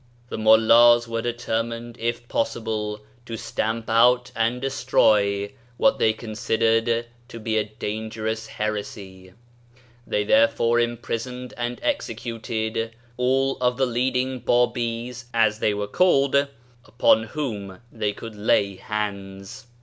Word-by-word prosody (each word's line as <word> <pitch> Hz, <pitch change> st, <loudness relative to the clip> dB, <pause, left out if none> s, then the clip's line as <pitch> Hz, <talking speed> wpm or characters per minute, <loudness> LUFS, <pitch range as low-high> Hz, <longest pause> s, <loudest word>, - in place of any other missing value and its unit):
The -, -, -4 dB
Mullahs 115 Hz, +2 st, +6 dB
were 115 Hz, 0 st, -2 dB
determined, 115 Hz, 0 st, -3 dB
if 120 Hz, +1 st, -3 dB
possible, 110 Hz, -2 st, -2 dB, 0.3 s
to 115 Hz, -, -5 dB
stamp 110 Hz, +1 st, -3 dB
out 125 Hz, +2 st, +4 dB
and 115 Hz, +2 st, 0 dB
destroy 105 Hz, -7 st, +2 dB, 0.3 s
what 275 Hz, -, +3 dB
they 110 Hz, -, +4 dB
considered 115 Hz, +1 st, 0 dB, 0.2 s
to 115 Hz, -3 st, -9 dB
be 110 Hz, 0 st, -2 dB
a 105 Hz, -, -1 dB
dangerous 110 Hz, +1 st, -4 dB
heresy; 100 Hz, -4 st, -5 dB, 0.7 s
they 105 Hz, -, 0 dB
therefore 115 Hz, +2 st, +3 dB
imprison 120 Hz, +1 st, -3 dB
ed 125 Hz, -, -10 dB
and 120 Hz, 0 st, -4 dB
executed 115 Hz, -, -3 dB, 0.2 s
all 135 Hz, +2 st, +1 dB
of 125 Hz, -1 st, 0 dB
the 135 Hz, -, +2 dB
leading 130 Hz, +1 st, -1 dB
Babis, 120 Hz, 0 st, 0 dB
as 110 Hz, -2 st, +3 dB
they 105 Hz, -, +2 dB
were 105 Hz, 0 st, -2 dB
called, 140 Hz, -, +3 dB, 0.4 s
upon 115 Hz, -2 st, +3 dB
whom 110 Hz, -8 st, -5 dB
they 105 Hz, -2 st, -1 dB
could 115 Hz, +2 st, -9 dB
lay 100 Hz, -2 st, +1 dB
hands. 100 Hz, +3 st, -5 dB
115 Hz, 120 wpm, -24 LUFS, 110-120 Hz, 0.7 s, Mullahs